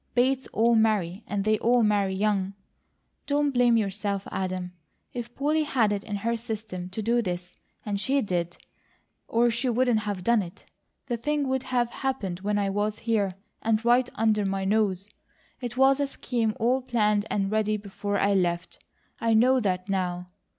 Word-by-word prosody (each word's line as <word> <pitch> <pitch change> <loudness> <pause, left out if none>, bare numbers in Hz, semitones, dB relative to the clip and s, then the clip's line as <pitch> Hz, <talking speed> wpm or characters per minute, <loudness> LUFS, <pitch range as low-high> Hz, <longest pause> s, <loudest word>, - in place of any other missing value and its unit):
Bates 260 +2 +2
all 230 +2 +3
marry; 215 -4 +1
and 200 -1 -1
they 215 +1 +2
all 240 0 +3
marry 200 -3 +2
young. 200 -1 0 0.7
Don't 290 0 +2
blame 245 -2 +4
yourself, 200 -1 -2
Adam. 185 -1 -3 0.4
If 240 -1 -6
Polly 300 +3 +1
had 250 -8 +2
it 200 0 -3
in 210 - -4
her 230 +4 -1
system 220 -5 -5
to 215 +4 -5
do 235 +2 +2
this, 180 -3 -4 0.3
and 205 -2 -2
she 270 +7 +1
did, 175 -3 -2 0.7
or 235 +1 +3
she 240 +3 0
wouldn't 245 -1 +2
have 205 -4 -4
done 235 0 +3
it, 175 -2 -10 0.4
the 240 -3 -2
thing 290 +4 -1
would 260 0 0
have 245 -2 0
happened 205 -10 -3
when 205 +2 -1
I 200 -1 +1
was 205 +1 -1
here, 210 -5 0 0.3
and 225 0 +1
right 245 +1 +4
under 215 -1 +2
my 195 0 -1
nose. 200 -2 +1 0.5
It 245 -1 -5
was 270 +1 +5
a 285 - +1
scheme 235 -5 -2
all 250 +3 +2
planned 210 -4 +1
and 195 -1 0
ready 215 0 +1
before 205 0 -3
I 200 0 +2
left. 175 -2 -1 0.4
I 230 -1 +2
know 255 +4 +5
that 185 -4 -1
now. 180 -2 -2
215 Hz, 175 wpm, -26 LUFS, 195-240 Hz, 0.7 s, was